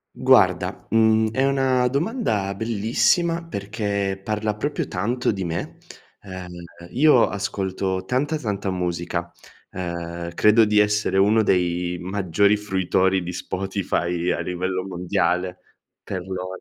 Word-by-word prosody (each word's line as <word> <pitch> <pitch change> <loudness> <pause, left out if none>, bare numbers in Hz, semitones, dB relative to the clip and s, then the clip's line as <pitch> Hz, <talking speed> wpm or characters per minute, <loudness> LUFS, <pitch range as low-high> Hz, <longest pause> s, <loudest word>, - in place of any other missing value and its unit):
Guarda, - - +3
mhmm, 110 0 +4
è 130 +4 +1
una 130 -2 +2
domanda 140 - -1
bellissima, 115 - +1
perché 100 -7 -3
parla 105 0 -2
proprio 145 +8 -2
tanto 115 +7 -1
di 95 -3 -4
me. 85 -1 -4 0.4
Uhm, 95 -2 -8 0.4
io 135 -2 +5
ascolto 95 -2 -3
tanta, 145 +8 0
tanta 105 -7 -3
musica, 85 -1 -3 0.4
uhm, 85 -1 -5
credo 110 +4 +5
di 105 0 +1
essere 105 -2 +2
uno 105 +3 +4
dei 90 -2 0
maggiori 100 +2 +1
fruitori 95 -2 +1
di 90 +1 -5
Spotify 90 -2 -2
a - - -1
livello 90 +1 -2
mondiale. 90 0 -1 0.5
Per 95 -2 -4
lo 95 0 -5
100 Hz, 120 wpm, -23 LUFS, 90-110 Hz, 0.5 s, io